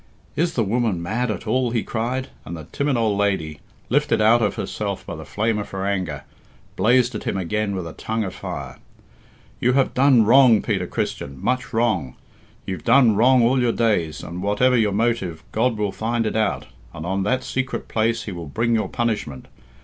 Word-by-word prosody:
"Is 170 Hz, +1 st, 0 dB
the 115 Hz, -, +2 dB
woman 110 Hz, -3 st, 0 dB
mad 110 Hz, +8 st, -2 dB
at 105 Hz, -, -4 dB
all?" 125 Hz, +3 st, +1 dB
he 115 Hz, -2 st, -1 dB
cried; 125 Hz, +4 st, -3 dB
and 85 Hz, +3 st, -7 dB
the 80 Hz, -, -8 dB
timid 140 Hz, -2 st, 0 dB
old 110 Hz, -3 st, +1 dB
lady, 80 Hz, -7 st, -1 dB, 0.3 s
lifted 145 Hz, +2 st, +1 dB
out 110 Hz, +2 st, +5 dB
of 105 Hz, -3 st, +1 dB
herself -, -, -4 dB
by -, -, -6 dB
the -, -, -9 dB
flame 110 Hz, 0 st, -1 dB
of 105 Hz, -, -5 dB
her 95 Hz, 0 st, -4 dB
anger, 90 Hz, -8 st, -2 dB, 0.5 s
blazed 125 Hz, +2 st, +3 dB
at 105 Hz, -, -6 dB
him -, -, -1 dB
again 100 Hz, +3 st, -1 dB
with 90 Hz, -2 st, -4 dB
a 80 Hz, -, -7 dB
tongue 110 Hz, 0 st, -3 dB
of 95 Hz, -2 st, -5 dB
fire. -, -, -7 dB, 0.8 s
"You 125 Hz, +1 st, +2 dB
have 135 Hz, 0 st, +2 dB
done 130 Hz, -4 st, +5 dB
wrong, 120 Hz, -2 st, +6 dB
Peter 95 Hz, -5 st, -1 dB
Christian, 70 Hz, -4 st, -4 dB
much 125 Hz, -, -1 dB
wrong; 105 Hz, -, 0 dB, 0.5 s
you've 95 Hz, -5 st, -5 dB
done 125 Hz, -2 st, +5 dB
wrong 125 Hz, +3 st, +5 dB
all 125 Hz, +2 st, +3 dB
your 120 Hz, -1 st, +2 dB
days, 105 Hz, -10 st, 0 dB
and 90 Hz, +2 st, -6 dB
whatever 105 Hz, +6 st, +2 dB
your 110 Hz, -4 st, +2 dB
motive, 100 Hz, -6 st, -1 dB
God 115 Hz, +1 st, +1 dB
will 105 Hz, -2 st, -1 dB
find 115 Hz, +2 st, -1 dB
it 110 Hz, -, -2 dB
out, 110 Hz, -1 st, 0 dB, 0.3 s
and 75 Hz, -, -6 dB
on 95 Hz, +2 st, -1 dB
that 125 Hz, +7 st, 0 dB
secret 130 Hz, 0 st, -3 dB
place 115 Hz, +1 st, 0 dB
he 105 Hz, -, -6 dB
will 85 Hz, -3 st, -7 dB
bring 115 Hz, +11 st, 0 dB
your 110 Hz, -1 st, 0 dB
punishment. 110 Hz, -, -2 dB
110 Hz, 195 wpm, -22 LUFS, 95-120 Hz, 0.8 s, wrong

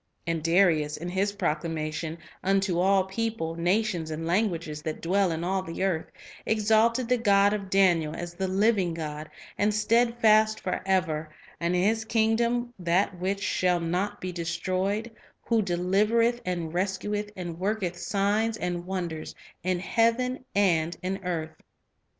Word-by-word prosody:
And 165 Hz, -1 st, -1 dB
Darius, 165 Hz, -3 st, +3 dB
in 175 Hz, +3 st, -5 dB
his 190 Hz, +3 st, 0 dB
proclamation 160 Hz, -2 st, -2 dB
" -, -, -26 dB
unto 195 Hz, -2 st, +1 dB
all 190 Hz, +1 st, +4 dB
people, 195 Hz, -3 st, -3 dB
na 180 Hz, +6 st, +2 dB
tions, 170 Hz, -7 st, -3 dB
and 160 Hz, +1 st, -4 dB
languages, 170 Hz, -5 st, -1 dB
that 155 Hz, 0 st, -4 dB
dwell 190 Hz, +1 st, +1 dB
in 165 Hz, +1 st, -3 dB
all 190 Hz, +2 st, 0 dB
the 165 Hz, 0 st, -4 dB
earth," 180 Hz, -5 st, 0 dB, 0.4 s
exalted 220 Hz, +3 st, +2 dB
the 250 Hz, 0 st, +2 dB
"God 200 Hz, -2 st, +4 dB
of 200 Hz, -2 st, -4 dB
Daniel 175 Hz, -5 st, +3 dB
" -, -, -7 dB
as 175 Hz, 0 st, -6 dB
"the 190 Hz, +2 st, -2 dB
living 190 Hz, -3 st, +2 dB
God, 155 Hz, -1 st, -5 dB, 0.3 s
and 205 Hz, +1 st, +3 dB
steadfast 220 Hz, 0 st, +3 dB
forever, 180 Hz, -4 st, -1 dB, 0.3 s
and 170 Hz, +1 st, 0 dB
His 215 Hz, +5 st, +2 dB
kingdom 235 Hz, +2 st, +1 dB
that 180 Hz, +2 st, +1 dB
which 195 Hz, +2 st, -2 dB
shall 180 Hz, -3 st, +1 dB
not 180 Hz, +4 st, -2 dB
be 185 Hz, -, -4 dB
destroyed;" 185 Hz, +6 st, -2 dB, 0.3 s
who 230 Hz, -2 st, +2 dB
"delivereth 210 Hz, +6 st, +2 dB
and 170 Hz, -3 st, -2 dB
rescueth, 200 Hz, +3 st, -2 dB
and 175 Hz, -2 st, -6 dB
worketh 195 Hz, -2 st, -1 dB
signs 210 Hz, +3 st, 0 dB
and 175 Hz, -2 st, -3 dB
wonders 175 Hz, -4 st, -4 dB, 0.3 s
in 185 Hz, 0 st, 0 dB
heaven 235 Hz, +6 st, +1 dB
and 170 Hz, -4 st, +2 dB
in 190 Hz, +1 st, -3 dB
earth." 160 Hz, -3 st, -4 dB
190 Hz, 150 wpm, -27 LUFS, 170-210 Hz, 0.4 s, all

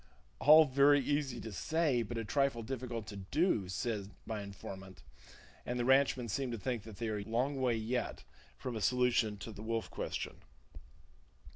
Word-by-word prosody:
"All 155 Hz, +2 st, +8 dB
very 140 Hz, +1 st, +5 dB
easy 140 Hz, -3 st, -1 dB
to 110 Hz, -, -6 dB
say, 145 Hz, -, +1 dB
but 115 Hz, +1 st, -4 dB
a 115 Hz, -, -2 dB
trifle 135 Hz, -1 st, +1 dB
difficult 120 Hz, -2 st, -4 dB
to 100 Hz, -1 st, -8 dB
do!" 100 Hz, -, +1 dB
said 100 Hz, 0 st, -2 dB, 0.2 s
my 110 Hz, -2 st, -3 dB
informant; 95 Hz, -4 st, -9 dB, 0.6 s
and 125 Hz, -, -3 dB
the 120 Hz, -, 0 dB
ranchman 135 Hz, -2 st, +4 dB
seem 130 Hz, +5 st, -2 dB
to 120 Hz, -, -3 dB
think 115 Hz, +3 st, -2 dB
they 110 Hz, +2 st, -6 dB
are 105 Hz, -1 st, -1 dB
yet 100 Hz, -, -7 dB
a -, -, -10 dB
long 130 Hz, +4 st, 0 dB
way 115 Hz, -4 st, +1 dB, 0.7 s
from 125 Hz, -2 st, -5 dB
a 110 Hz, -, -3 dB
solution 120 Hz, -1 st, +2 dB
of 110 Hz, -, -8 dB
the -, -, -8 dB
wolf 115 Hz, 0 st, -2 dB
question. -, -, -4 dB
120 Hz, 170 wpm, -34 LUFS, 105-135 Hz, 0.7 s, All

